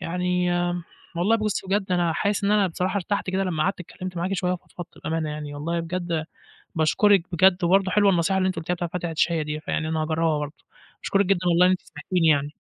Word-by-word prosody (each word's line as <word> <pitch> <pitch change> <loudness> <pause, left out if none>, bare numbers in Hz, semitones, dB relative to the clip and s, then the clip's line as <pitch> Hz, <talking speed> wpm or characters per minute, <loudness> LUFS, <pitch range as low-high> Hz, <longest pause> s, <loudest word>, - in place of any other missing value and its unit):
يعني 180 0 0 0.7
والله 200 +7 +3
بُصي، 215 -3 -2
بجد 195 -1 0
أنا 175 -2 +2
حاسس 200 +4 0
إن 200 - +2
أنا 210 -2 +4
بصراحة 185 +2 -2
ارتحت 200 0 -2
كده، 190 +1 0
لما 160 -4 -1
قعدت 190 0 -1
اتكلمت 180 +1 -8
معاكِ 180 +3 -2
شوية، 180 0 0
وفضفضت 175 -1 -9
بأمانة 160 -1 -1
يعني، 150 -1 -6
والله 165 +4 -2
بجد 170 -1 -3 0.5
باشكرِك، 180 +4 +4
بجد 185 0 +4
برضه 190 +2 +3
حلوة 205 -1 +4
النصيحة 180 +2 +1
اللي 185 0 +2
أنتِ 185 - -1
قلتيها 175 +2 -2
بتاعة 175 -1 -4
فاتح 175 -1 -2
الشهية 165 0 +1
دي، 150 0 -4
فيعني 155 0 -2
أنا 160 0 -1
هاجربها 160 0 +1
برضه، 150 +1 -7 0.4
أشكرِك 200 0 +2
جدًا 195 -1 +2
والله 175 +1 +5
إن 185 - +5
أنتِ 185 - 0
سمعتيني 165 +3 -1
يعني. 145 -1 +2
180 Hz, 210 wpm, -24 LUFS, 160-190 Hz, 0.7 s, والله